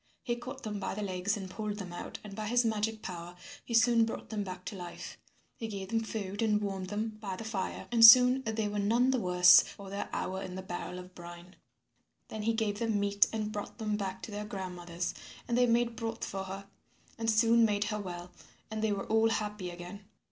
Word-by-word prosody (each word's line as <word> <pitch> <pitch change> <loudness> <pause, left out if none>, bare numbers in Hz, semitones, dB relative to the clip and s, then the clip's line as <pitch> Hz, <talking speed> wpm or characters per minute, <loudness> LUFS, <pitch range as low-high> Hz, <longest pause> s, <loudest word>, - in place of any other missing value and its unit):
He 240 - -1
caught 255 +2 -8
them 210 -2 -4
by 195 - -3
the 210 - -3
legs 190 +2 -1
and 195 -2 -6
pulled 210 +2 -4
them 185 -4 -6
out 175 - -6
and 210 -2 -9
by 215 0 -4
his 245 +2 +3
magic 220 0 -1
power 175 -1 -7 0.3
he 235 - -3
soon 230 0 +5
brought 225 - -4
them 215 -2 -2
back 185 -1 -7
to 210 - -5
life. 175 -2 -8 0.4
He 225 - -4
gave 195 -3 -6
them 225 0 +1
food 205 -2 -4
and 215 -2 +3
warmed 195 -2 -3
them 215 +1 -3
by 195 -3 -4
the 225 - -7
fire 210 -4 -4
and 230 -1 +4
soon 250 +3 +10
they 220 -3 -1
were 205 0 -2
none 235 +6 +3
the 260 - +1
worse 180 -2 +7
for 195 -1 -10
their 200 - -4
hour 190 +1 -3
in 185 -1 -6
the 190 - -5
barrel 180 0 -5
of 180 0 -10
brine. 175 +1 -11 0.7
Then 215 - -5
he 225 +2 +1
gave 215 -2 -1
them 225 -3 0
meat 200 0 +3
and 215 -1 -2
brought 205 -1 -6
them 215 -2 -1
back 190 -2 -4
to - - -6
their 205 0 -4
grandmother. 180 -4 -7 0.5
And 235 - 0
they 245 0 +4
made 235 0 +2
broth 230 -1 -4
for 195 0 -4
her 195 +1 -7 0.5
and 225 0 0
soon 230 +1 +5
made 205 -2 +2
her 210 0 -2
well, 180 -2 -7 0.4
and 220 0 -3
they 220 -1 +1
were 200 -1 -2
all 220 +1 +3
happy 210 -4 -2
again. 175 +3 -9
210 Hz, 225 wpm, -31 LUFS, 190-225 Hz, 0.7 s, soon